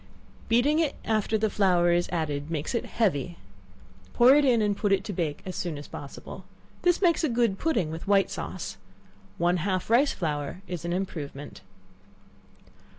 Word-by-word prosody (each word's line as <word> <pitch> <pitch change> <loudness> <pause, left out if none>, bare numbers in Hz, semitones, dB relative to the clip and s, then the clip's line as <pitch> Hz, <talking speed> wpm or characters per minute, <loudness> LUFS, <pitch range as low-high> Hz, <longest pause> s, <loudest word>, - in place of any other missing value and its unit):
Beating 260 +7 +3
it 310 -4 0
after 220 0 +1
the 220 +1 +1
flour 180 -4 +3
is 175 0 +1
added 150 -3 -2
makes 160 - -3
it 235 - -1
heavy; 175 - -1 0.8
pour 245 +2 +7
it 295 +1 +5
in, 250 -4 +4
and 205 -1 +1
put 205 0 -1
it 195 - +2
to 205 - -5
bake 165 -5 -3
as 185 - -5
soon 170 -4 -3
as 145 - -9
possible. 140 - -9 0.4
This 355 +2 +2
makes 340 -2 +3
a 310 - +2
good 230 -5 +1
pudding, 190 - 0
with 160 +3 -7
white 195 -1 +3
sauce. - - -5 0.6
One 175 +1 +2
half 185 +3 -2
rice 270 +5 +5
flour 150 +2 -3
is 175 -2 -5
an 170 - -2
improvement. 155 -6 -5
190 Hz, 170 wpm, -27 LUFS, 165-230 Hz, 0.8 s, pour